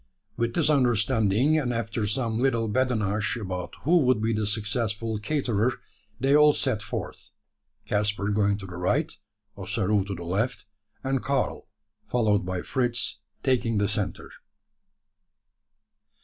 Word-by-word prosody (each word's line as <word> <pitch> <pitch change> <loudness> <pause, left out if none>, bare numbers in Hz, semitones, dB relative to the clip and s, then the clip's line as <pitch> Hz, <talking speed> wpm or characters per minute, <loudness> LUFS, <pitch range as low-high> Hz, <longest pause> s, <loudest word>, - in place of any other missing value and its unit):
With 115 0 -1
this - - +2
understanding, 120 +1 +3
and 125 -5 -1
after 115 -2 -2
some 115 0 -1
little 115 -3 +1
badinage 110 -3 0
about 90 -4 -5
who 170 +5 +5
would 130 -6 +3
be 110 +1 0
the 105 -1 -1
successful 110 +1 -1
caterer, 120 -2 0 0.4
they 135 +3 +3
all 150 0 +7
set 130 -8 -1
forth, 105 - -6 0.6
Caspar 105 -1 0
going 100 -1 +2
to 100 - -8
the 90 -2 -8
right, 90 +1 0 0.4
Ossaroo 100 +1 0
to 100 -1 -4
the 85 - -7
left, 105 +10 -1 0.4
and 135 -1 0
Karl, 140 0 -1 0.4
followed 105 -6 +1
by 90 -1 -2
Fritz, 120 -4 -1 0.2
taking 120 -4 +1
the 100 0 +2
centre. 105 -1 -3
110 Hz, 135 wpm, -26 LUFS, 105-125 Hz, 0.6 s, all